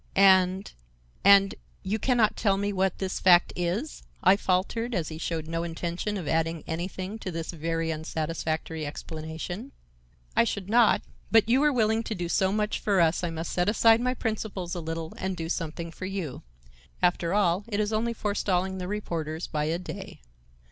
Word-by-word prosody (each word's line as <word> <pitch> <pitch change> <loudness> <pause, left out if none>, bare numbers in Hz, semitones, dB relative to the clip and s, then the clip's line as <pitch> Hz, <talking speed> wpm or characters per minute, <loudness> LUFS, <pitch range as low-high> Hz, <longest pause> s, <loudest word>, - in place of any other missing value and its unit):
"And—and—you 190 - +2
can 250 +3 +1
not 215 -3 +3
tell 195 -3 +2
me 200 +1 -1
what 190 -1 +1
this 190 -1 -3
fact 175 -2 +5
is?" 180 - -2 0.2
I 190 +1 +7
faltered 205 +5 0
as 165 -4 -1
he 155 0 -7
showed 160 -1 -3
no 165 0 -2
intention 170 +4 -3
of 175 -6 -5
adding 165 0 0
anything 185 +5 -4
to 190 - -5
this 165 -2 -4
very 165 0 -2
unsatisfactory 160 0 -3
explanation. 160 - -6 0.6
"I - - +6
should 190 - -3
not, 235 -1 +5 0.3
but 225 -2 +5
you 245 +3 +4
were 300 0 +4
willing 220 -3 +2
to 220 - -3
do 175 -2 -3
so 190 +2 +2
much 210 +1 0
for 200 -3 +1
us 165 +1 +3
I 175 - 0
must 165 0 -4
set 180 +2 +2
aside 225 +1 +5
my 250 +1 0
principles 210 -6 -3
a 175 - -3
little 165 0 -5
and 190 -1 -3
do 165 0 -4
something 165 0 -3
for 185 +3 -6
you. 185 -9 -4 0.6
After 175 0 +2
all, 190 -1 +2
it 210 -2 -2
is 210 +1 0
only 230 +2 0
forestalling 190 -3 -1
the 180 - -4
reporters 170 -6 -3
by 150 -1 -2
a 160 +2 0
day. 180 - -8
185 Hz, 175 wpm, -27 LUFS, 165-205 Hz, 0.6 s, I